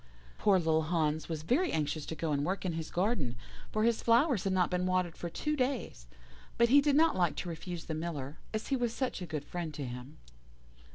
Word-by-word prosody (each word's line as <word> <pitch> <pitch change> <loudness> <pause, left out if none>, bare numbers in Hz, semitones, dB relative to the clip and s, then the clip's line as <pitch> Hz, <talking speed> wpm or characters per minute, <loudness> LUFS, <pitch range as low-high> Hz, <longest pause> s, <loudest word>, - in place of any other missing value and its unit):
"Poor 200 -2 +5
little 160 -2 +2
Hans 155 -1 0
was 155 -2 -3
very 310 - +2
anxious 150 -1 -1
to 160 - -4
go 160 -1 -2
and 140 -1 +1
work 190 +4 -2
in 175 - 0
his 160 -1 -4
garden, 175 - 0 0.4
for 215 - +1
his 230 0 +2
flowers 235 - +3
had 195 - +1
not 185 -1 +2
been 180 0 0
watered 185 -2 +1
for 170 - -5
two 300 - -1
days, 255 - -2 0.5
but 235 0 +5
he 285 +3 +7
did 285 -1 +3
not 320 +2 +5
like 175 -3 +2
to 175 - -4
refuse 170 +1 -6
the 160 - -3
Miller, 155 -3 -4
as 215 0 -3
he 275 - +2
was 240 -3 0
such 260 -7 -2
a 180 - -4
good 150 -3 -4
friend 170 -4 -5
to 145 - -4
him. 125 +4 -8
175 Hz, 225 wpm, -32 LUFS, 155-230 Hz, 0.5 s, he